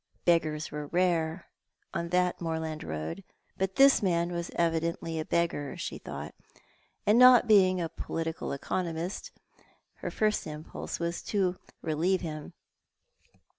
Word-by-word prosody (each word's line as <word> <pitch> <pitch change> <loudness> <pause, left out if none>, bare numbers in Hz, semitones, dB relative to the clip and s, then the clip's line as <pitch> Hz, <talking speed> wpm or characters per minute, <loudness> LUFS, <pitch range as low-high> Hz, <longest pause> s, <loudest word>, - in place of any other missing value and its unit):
Beggars 155 -3 +2
were 150 -1 -5
rare 170 -1 +1 0.5
on 170 0 -2
that 180 0 +1
moorland 160 -2 -3
road, 80 - -5 0.4
but 190 0 -1
this 275 0 +6
man 175 -3 +1
was 170 0 -3
evidently 165 -1 0
a 155 - -3
beggar, 165 -5 -1
she - - -5
thought; - - -7 0.7
and 210 +3 +5
not 250 -1 +8
being 185 -4 +5
a 170 - -1
political 165 -1 -4
economist, 170 - -3 0.7
her - - -4
first 215 -1 0
impulse 150 +1 -6
was 170 0 -2
to 185 -3 0 0.2
relieve 170 +4 +1
him. 155 -1 -6
170 Hz, 130 wpm, -29 LUFS, 160-185 Hz, 0.7 s, not